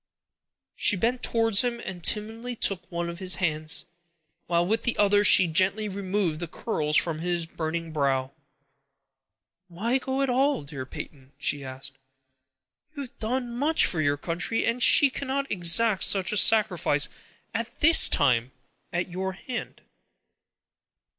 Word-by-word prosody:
She 205 Hz, -, +2 dB
bent 240 Hz, +6 st, -1 dB
towards 225 Hz, -3 st, +2 dB
him 240 Hz, -1 st, -2 dB
and 180 Hz, -6 st, -8 dB
timidly 225 Hz, +3 st, -2 dB
took 195 Hz, -5 st, -1 dB
one 170 Hz, 0 st, -3 dB
of 170 Hz, +1 st, -7 dB
his 185 Hz, -1 st, 0 dB
hands, 155 Hz, -3 st, -2 dB, 0.6 s
while 170 Hz, 0 st, +1 dB
with 220 Hz, +5 st, 0 dB
the 240 Hz, -, -1 dB
other 205 Hz, 0 st, +3 dB
she 190 Hz, -2 st, +6 dB
gently 190 Hz, +6 st, 0 dB
removed 190 Hz, -4 st, -2 dB
the 175 Hz, -, -5 dB
curls 150 Hz, -4 st, -2 dB
from 165 Hz, -2 st, 0 dB
his 175 Hz, 0 st, -2 dB
burning 165 Hz, 0 st, -5 dB
brow. 135 Hz, -3 st, -1 dB, 1.4 s
"Why 225 Hz, +9 st, -2 dB
go 265 Hz, +1 st, -2 dB
at 270 Hz, -, -1 dB
all, 270 Hz, -, +1 dB
dear 140 Hz, -2 st, -7 dB
Peyton?" 135 Hz, 0 st, -10 dB
she 145 Hz, -1 st, -2 dB
asked. 130 Hz, 0 st, -9 dB, 1.0 s
"You 285 Hz, -, -5 dB
have 260 Hz, +1 st, -12 dB
done 240 Hz, +1 st, -3 dB
much 295 Hz, +6 st, +2 dB
for 160 Hz, -, 0 dB
your 145 Hz, -1 st, 0 dB
country, 170 Hz, +9 st, -2 dB
and 235 Hz, +2 st, -1 dB
she 275 Hz, +2 st, +6 dB
cannot 275 Hz, +1 st, -4 dB
exact 190 Hz, +3 st, +3 dB
such 195 Hz, -2 st, +3 dB
a 210 Hz, -, 0 dB
sacrifice 180 Hz, -10 st, +4 dB, 0.5 s
as 230 Hz, +1 st, -3 dB
this 325 Hz, +2 st, +5 dB, 0.8 s
at 175 Hz, +1 st, -2 dB
your 190 Hz, +1 st, -4 dB
hand." 245 Hz, +6 st, -8 dB
190 Hz, 145 wpm, -25 LUFS, 165-230 Hz, 1.4 s, she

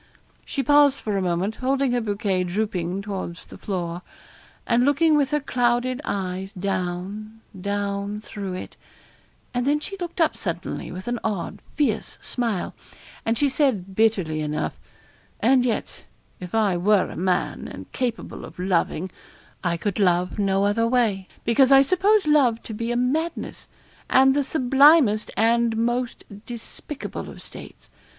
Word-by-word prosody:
She 275 Hz, -, -2 dB
paused 290 Hz, -1 st, +5 dB
for 210 Hz, -2 st, -2 dB
a 195 Hz, -, +1 dB
moment, 185 Hz, +4 st, -1 dB
holding 270 Hz, 0 st, +1 dB
her 245 Hz, 0 st, +1 dB
bouquet 205 Hz, -3 st, 0 dB
drooping 185 Hz, -1 st, -2 dB
towards 190 Hz, -4 st, -5 dB
the -, -, -12 dB
floor, 175 Hz, -3 st, -3 dB, 0.6 s
and 240 Hz, +1 st, +3 dB
looking 300 Hz, +3 st, +4 dB
with 285 Hz, -3 st, +2 dB
her 300 Hz, 0 st, +1 dB
clouded 250 Hz, -1 st, 0 dB
eyes 190 Hz, -2 st, -3 dB
down 195 Hz, +3 st, -4 dB, 0.2 s
down 200 Hz, +1 st, -2 dB
through 200 Hz, -3 st, -6 dB
it; 185 Hz, -, -8 dB, 0.8 s
and 245 Hz, +1 st, -1 dB
then 295 Hz, +1 st, +3 dB
she 395 Hz, +6 st, -6 dB
looked 350 Hz, 0 st, -5 dB
up 325 Hz, -, +3 dB
suddenly, -, -, -4 dB
with 185 Hz, +4 st, -8 dB
an 240 Hz, -1 st, -1 dB
odd, 205 Hz, -1 st, -3 dB, 0.2 s
fierce 245 Hz, -8 st, 0 dB
smile, 230 Hz, -7 st, -2 dB, 0.5 s
and 225 Hz, +1 st, +2 dB
she 290 Hz, -, +3 dB
said 255 Hz, -, +1 dB
bitterly 190 Hz, -8 st, +1 dB
enough 150 Hz, 0 st, -3 dB, 0.6 s
'and 250 Hz, +1 st, +4 dB
yet, 230 Hz, -, -3 dB, 0.3 s
if 180 Hz, +3 st, -6 dB
I 205 Hz, -5 st, +2 dB
were 200 Hz, +2 st, +3 dB
a -, -, -8 dB
man, 180 Hz, 0 st, -1 dB
and -, -, -10 dB
capable 245 Hz, -4 st, -3 dB
of -, -, -11 dB
loving, 180 Hz, -1 st, 0 dB, 0.5 s
I 170 Hz, -2 st, 0 dB
could 205 Hz, +3 st, -2 dB
love 180 Hz, 0 st, +2 dB
no 195 Hz, 0 st, +2 dB
other 225 Hz, +3 st, +2 dB
way; 220 Hz, -6 st, +1 dB, 0.2 s
because 255 Hz, +4 st, +4 dB
I 270 Hz, 0 st, +8 dB
suppose 385 Hz, +6 st, +3 dB
love 275 Hz, -7 st, +3 dB
to 225 Hz, -, -7 dB
be 230 Hz, +2 st, -3 dB
a 240 Hz, -, 0 dB
madness, 310 Hz, +7 st, -2 dB, 0.4 s
and 265 Hz, 0 st, +6 dB
the 285 Hz, +1 st, +2 dB
sublimest 270 Hz, -4 st, +4 dB
and 230 Hz, +1 st, +3 dB
the -, -, -4 dB
most 240 Hz, +1 st, -1 dB, 0.2 s
despicable 245 Hz, +4 st, -7 dB
of -, -, -11 dB
states. -, -, -12 dB
220 Hz, 155 wpm, -24 LUFS, 190-260 Hz, 0.8 s, I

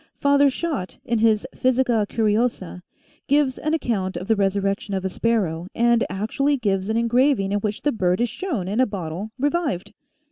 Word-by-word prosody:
Father 280 Hz, 0 st, +4 dB
Schott, 275 Hz, -, -4 dB
in 235 Hz, -1 st, 0 dB
his 220 Hz, -1 st, +3 dB
" -, -, -32 dB
Physica 250 Hz, -4 st, +1 dB
Curiosa," 215 Hz, -5 st, 0 dB, 0.5 s
gives 285 Hz, -2 st, +2 dB
an 310 Hz, +1 st, 0 dB
account 205 Hz, -11 st, -2 dB
of 185 Hz, -, -6 dB
the 225 Hz, -, +3 dB
resurrection 200 Hz, 0 st, -1 dB
of 190 Hz, 0 st, -3 dB
a -, -, 0 dB
sparrow 185 Hz, -6 st, -1 dB
and 235 Hz, 0 st, +3 dB
actually 250 Hz, +9 st, 0 dB
gives 195 Hz, -4 st, -1 dB
an 220 Hz, -, +1 dB
engraving 235 Hz, -3 st, +2 dB
in 205 Hz, -, +1 dB
which 210 Hz, 0 st, -3 dB
the 295 Hz, -, +2 dB
bird 185 Hz, -5 st, 0 dB
is 240 Hz, -, +2 dB
shown 245 Hz, -, -4 dB
in 205 Hz, +5 st, -1 dB
a 260 Hz, -, +4 dB
bottle 185 Hz, 0 st, -5 dB
revived 290 Hz, -, -1 dB
220 Hz, 180 wpm, -23 LUFS, 195-260 Hz, 0.5 s, Father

